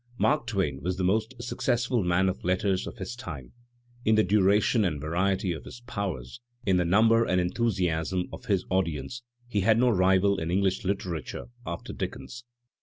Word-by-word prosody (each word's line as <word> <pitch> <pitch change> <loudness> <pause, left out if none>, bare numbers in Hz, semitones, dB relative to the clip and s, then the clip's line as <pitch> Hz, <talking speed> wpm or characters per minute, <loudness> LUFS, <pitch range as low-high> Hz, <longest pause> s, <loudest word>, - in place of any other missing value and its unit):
Mark 150 -4 +2
Twain 95 - -1
was 90 +1 -2
the 95 - -1
most 110 +6 +1
successful 120 -2 0
man 90 +2 +2
of 95 - -2
letters 95 +1 0
of - - -8
his 105 +3 -5
time; 75 - -8 0.5
in 110 -2 +4
the 110 - +5
duration 105 +3 +3
and 80 -7 0
variety 95 +4 0
of 80 - -8
his 120 - -11
powers, 100 - -5 0.2
in 95 -2 +3
the 90 - +2
number 115 +6 +5
and 95 -5 +1
enthusiasm 90 -3 0
of - - -9
his 100 -6 +1
audience 85 - -1 0.3
he 105 -4 -1
has 110 +3 +4
no 125 +1 +4
rival 95 0 +3
in 80 - -3
Enghsh 95 +1 +1
literature 90 - -3 0.2
after 85 - -5
Dickens. 120 -1 -6
95 Hz, 175 wpm, -27 LUFS, 90-110 Hz, 0.5 s, the